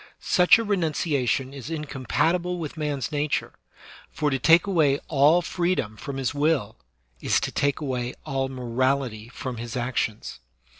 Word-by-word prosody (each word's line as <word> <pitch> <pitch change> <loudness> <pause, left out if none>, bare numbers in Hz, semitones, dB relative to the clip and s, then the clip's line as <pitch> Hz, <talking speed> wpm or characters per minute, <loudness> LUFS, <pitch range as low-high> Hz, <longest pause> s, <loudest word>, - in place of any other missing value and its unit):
Such 180 +3 +5
a 230 - -1
renunciation 150 - 0
is 140 +1 -8
incompatible 165 +4 -1
with 160 -4 -5
man's 150 -4 -3
nature, 150 0 -1 0.6
for 150 -1 -1
to 135 - 0
take 165 +6 +5
away 155 -8 +3
all 155 +4 +4
freedom 170 - -1
from 135 +5 -6
his 135 0 -1
will 145 -7 0 0.4
is - - +2
to - - -3
take 140 -1 0
away 125 -3 -3
all 135 -3 -1
morality 125 -2 -1
from 125 -1 -6
his 115 +1 -5
actions. 120 -3 -2
140 Hz, 145 wpm, -25 LUFS, 130-160 Hz, 0.6 s, Such